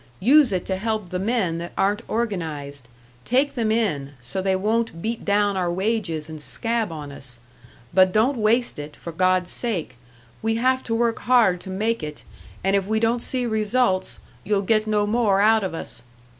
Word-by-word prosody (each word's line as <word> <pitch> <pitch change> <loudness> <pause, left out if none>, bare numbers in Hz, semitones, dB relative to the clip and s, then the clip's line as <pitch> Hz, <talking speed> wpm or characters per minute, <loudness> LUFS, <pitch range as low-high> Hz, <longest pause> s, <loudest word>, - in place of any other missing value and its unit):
Use 270 +3 +5
it 185 -2 -1
to 190 - -1
help 215 -2 -2
the 180 - -3
men 190 -5 0
that 170 +1 -7
aren't 205 +3 +1
organised 155 - -3 0.4
take 265 +4 +2
them 225 -3 0
in, 150 -12 0
so 150 +11 -4
they 190 0 +1
won't 215 -2 0
beat 225 +6 -3
down 205 0 +2
our 180 -2 0
wages 185 -5 -1
and 155 -1 -8
scab 225 +3 -1
on 150 -3 -7
us. 125 -4 -6 0.5
But 185 -1 +5
don't 235 +6 +2
waste 225 -2 +2
it, 145 +1 -7
for 170 - -8
God's 185 +1 +1
sake; 175 - -3 0.4
we 225 0 0
have 260 +3 +2
to 225 - -1
work 230 0 +1
hard 225 -8 +3
to - - -9
make 215 +4 -1
it, 150 -1 -7 0.4
and 195 +1 +2
if 195 -1 0
we 220 +1 +1
don't 230 +1 +1
see 250 0 -2
results, 220 -3 0 0.3
you'll 205 -1 0
get 215 +2 +2
no 210 -1 +2
more 210 -2 +2
out 220 +1 +4
of 185 -3 -3
us.' - - -5
205 Hz, 185 wpm, -23 LUFS, 180-230 Hz, 0.5 s, Use